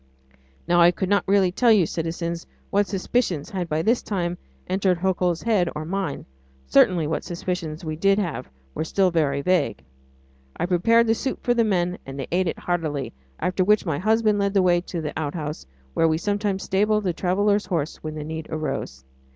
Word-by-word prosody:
Now 175 0 +4
I 170 - +8
could 180 +2 -2
not 205 0 +2
really 195 -2 +3
tell 235 +5 +3
you, 205 -6 +5
citizens, 170 +1 -4 0.2
what 200 0 +2
suspicions 190 - -1
had 180 -4 -3
by 155 +1 0
this 235 +6 +2
time 175 -3 -2 0.3
entered 185 -1 +1
Hercule's 180 -1 0
head 205 -7 +2
or 150 +1 -4
mine; 185 -4 -3 0.4
certainly 165 - +4
what 150 +1 -2
suspicions 170 -2 -4
we 155 0 -3
did 195 +5 +3
have 175 - -3 0.2
were - - -2
still 185 +3 +1
very 140 -4 +1
vague. 140 - +1 0.7
I - - 0
prepared 230 +6 +3
the 225 - +3
soup 260 +3 -4
for 245 - +3
the 235 -1 +3
men 180 -4 0
and 135 +1 -8
they 135 - -3
ate 180 +1 +1
it - - -2
heartily, 155 -8 -2 0.3
after 185 +1 0
which 210 +2 +3
my 155 -5 -1
husband 215 +1 +2
led 200 0 0
the 195 - +4
way 175 -1 +3
to 175 -1 -5
the 150 - -4
outhouse 150 - -4 0.3
where 165 - +3
we 160 0 +2
sometimes 205 +1 -1
stabled 210 +2 +1
a 180 - +1
traveller's 200 +4 +1
horse 165 -5 -2
when 155 0 -6
the 155 - -5
need 160 +1 -6
arose. 155 - -4
180 Hz, 190 wpm, -24 LUFS, 160-200 Hz, 0.7 s, I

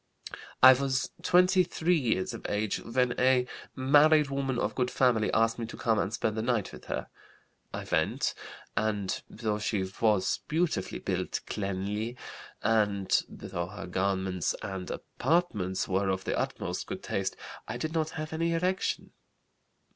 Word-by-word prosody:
"I 130 0 +12
was 130 0 -1
23 180 -1 +3
years 115 - 0
of - - -6
age 105 0 0
when 125 +1 0
a 125 0 +4 0.3
married 145 +2 +5
woman 135 -2 -1
of - - 0
good 125 -1 0
family 120 -5 +2
asked 115 +1 +2
me 115 - -3
to - - -9
come 110 -2 +1
and 95 - 0
spend 110 -1 -1
the 110 - -1
night 115 -3 0
with - - -11
her. - - -3 0.6
I - - -5
went, - - 0 0.4
and 105 -3 -1
though 105 -2 -2
she 105 -3 0 0.2
was 105 -4 +3
beautifully 155 - 0
built, - - -2
cleanly, 105 +4 -3 0.5
and 105 -3 +2
though 85 0 -5
her 100 +1 -8
garments 95 -1 0
and 95 -2 -5
apartments 105 - 0
were 95 +1 +1
of 95 0 -1
the - - -1
utmost - - -3
good - - -6
taste, 95 -1 -2 0.3
I - - -4
did 155 0 -3
not 160 -1 0
have 155 0 -4
any 165 +1 0
erection. 180 +3 -1
115 Hz, 150 wpm, -29 LUFS, 100-140 Hz, 0.6 s, I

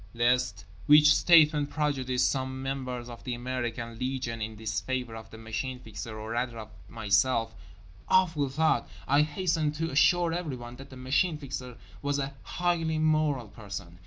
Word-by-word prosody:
Lest 120 -5 +1 0.2
which 150 0 +8
statement 150 -4 +5
prejudice 130 -5 0
some 130 -1 -1
members 130 -3 -4
of 120 -1 -10
the 125 -2 -3
American 120 -2 -4
Legion 125 -3 -3
in 110 +1 -4
disfavour 110 +3 -3
of 110 -1 -9
the 110 - -11
Machine 110 +4 -4
Fixer 110 -2 -8
or 110 +1 -6
rather 120 0 -2
of 110 -1 -8 0.2
myself—awful 110 - 0
thought—I 145 -1 +1
hasten 155 0 0
to 165 +1 -2
assure 170 +4 +4
everyone 130 -8 -5
that 135 +1 -11
the 130 - -11
Machine 140 +6 +1
Fixer 130 -4 -6 0.2
was 145 0 0
a 140 0 -3
highly 165 -2 0
moral 155 -6 +1
person. 100 -5 -8
130 Hz, 145 wpm, -29 LUFS, 115-150 Hz, 0.2 s, which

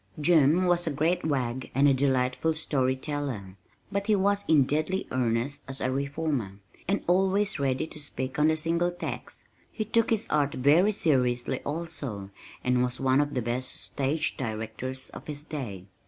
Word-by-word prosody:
Jim 160 +2 +4
was 175 -1 +2
a - - +1
great 165 +5 +1
wag 130 -4 -1
and 140 +2 +5
a 140 - +5
delightful 130 +3 +1
story 130 -4 +1
teller, 130 -9 -4 0.4
but 200 +1 -2
he 215 - +4
was 200 +1 +2
in 155 -3 +6
deadly 155 +8 -1
earnest 125 +3 0
as 135 0 -6
a 130 - 0
reformer, 140 -5 -2 0.3
and 200 +3 0
always 195 +1 +2
ready 135 -1 0
to 155 - -10
speak 130 -2 -4
on 150 - +5
The 160 0 +2
Single 170 +2 +1
Tax. 175 - -6 0.3
He 215 - -3
took 230 +1 +3
his 225 -1 +1
art 145 -2 +1
very 155 +10 +4
seriously 130 - +1
also, 145 -11 -5 0.3
and 125 0 +2
was 125 0 -1
one 135 +1 +3
of 145 -1 -2
the 125 - 0
best 125 +2 -3
stage 145 +3 -1
directors 115 +3 -4
of - - -10
his 150 -1 -4
day. 120 - -6
145 Hz, 170 wpm, -28 LUFS, 130-165 Hz, 0.4 s, in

